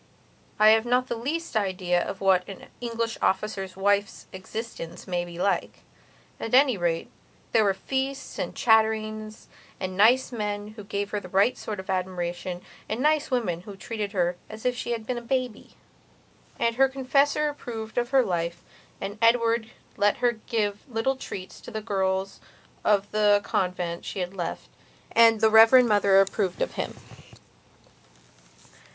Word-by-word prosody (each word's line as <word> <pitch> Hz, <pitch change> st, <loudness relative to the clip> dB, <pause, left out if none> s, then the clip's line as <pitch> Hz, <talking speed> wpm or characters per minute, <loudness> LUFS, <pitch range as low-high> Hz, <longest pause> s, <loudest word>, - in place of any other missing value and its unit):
I 215 Hz, 0 st, +7 dB
have 220 Hz, +2 st, +4 dB
not 250 Hz, +1 st, +2 dB
the -, -, -1 dB
least 290 Hz, +6 st, -4 dB
idea 185 Hz, -4 st, +1 dB
of 195 Hz, -, -5 dB
what 190 Hz, -1 st, +3 dB
an 195 Hz, -, -10 dB
English 230 Hz, -1 st, -3 dB
officer's 195 Hz, -2 st, -1 dB
wife's 200 Hz, +1 st, 0 dB
existence 190 Hz, -2 st, -7 dB
may 175 Hz, -1 st, -1 dB
be 175 Hz, -1 st, -9 dB
like. 195 Hz, +2 st, -1 dB, 0.6 s
At 225 Hz, -, 0 dB
any 265 Hz, -2 st, +5 dB
rate, 170 Hz, -3 st, -1 dB, 0.4 s
there 225 Hz, -, +4 dB
were 195 Hz, -2 st, +2 dB
feasts, 270 Hz, +5 st, -3 dB
and -, -, -3 dB
chatterings, 215 Hz, -1 st, +1 dB, 0.3 s
and 185 Hz, -1 st, -4 dB
nice 235 Hz, +7 st, +4 dB
men 210 Hz, -2 st, -3 dB
who 215 Hz, -1 st, -11 dB
gave 200 Hz, 0 st, -3 dB
her 210 Hz, -, -1 dB
the 185 Hz, -, -11 dB
right 195 Hz, +6 st, +3 dB
sort 210 Hz, -3 st, -6 dB
of 190 Hz, -, -8 dB
admiration, 180 Hz, -1 st, -3 dB, 0.3 s
and 220 Hz, -, -2 dB
nice 300 Hz, +2 st, +2 dB
women 210 Hz, -10 st, -1 dB
who 200 Hz, +2 st, -10 dB
treated 210 Hz, 0 st, -4 dB
her 175 Hz, -2 st, 0 dB
as 215 Hz, +2 st, -10 dB
if 250 Hz, 0 st, +1 dB
she 240 Hz, -, -5 dB
had 225 Hz, -2 st, -5 dB
been 245 Hz, +1 st, -2 dB
a -, -, -12 dB
baby. 250 Hz, -2 st, -3 dB, 0.8 s
And 230 Hz, 0 st, 0 dB
her 270 Hz, 0 st, +5 dB
confessor 275 Hz, +3 st, +2 dB
approved 225 Hz, -6 st, -6 dB
of 240 Hz, 0 st, -2 dB
her 265 Hz, -1 st, +4 dB
life, 170 Hz, -1 st, -2 dB, 0.4 s
and 200 Hz, +2 st, -6 dB
Edward 230 Hz, -1 st, +3 dB, 0.3 s
let 205 Hz, 0 st, +3 dB
her 245 Hz, -1 st, +2 dB
give 215 Hz, -2 st, -2 dB
little 240 Hz, +3 st, 0 dB
treats 190 Hz, -7 st, -8 dB
to -, -, -10 dB
the 220 Hz, -2 st, -4 dB
girls 195 Hz, -2 st, -1 dB, 0.4 s
of 205 Hz, -1 st, +2 dB
the 210 Hz, -1 st, +4 dB
convent 180 Hz, -2 st, -2 dB
she -, -, -6 dB
had 180 Hz, 0 st, -3 dB
left, 180 Hz, -3 st, -5 dB, 0.4 s
and 225 Hz, -1 st, +5 dB
the 220 Hz, 0 st, +5 dB
Reverend 225 Hz, +3 st, +8 dB
Mother 200 Hz, -2 st, +4 dB
approved 195 Hz, -1 st, 0 dB
of -, -, -4 dB
him. -, -, -4 dB
215 Hz, 160 wpm, -26 LUFS, 190-235 Hz, 0.8 s, Reverend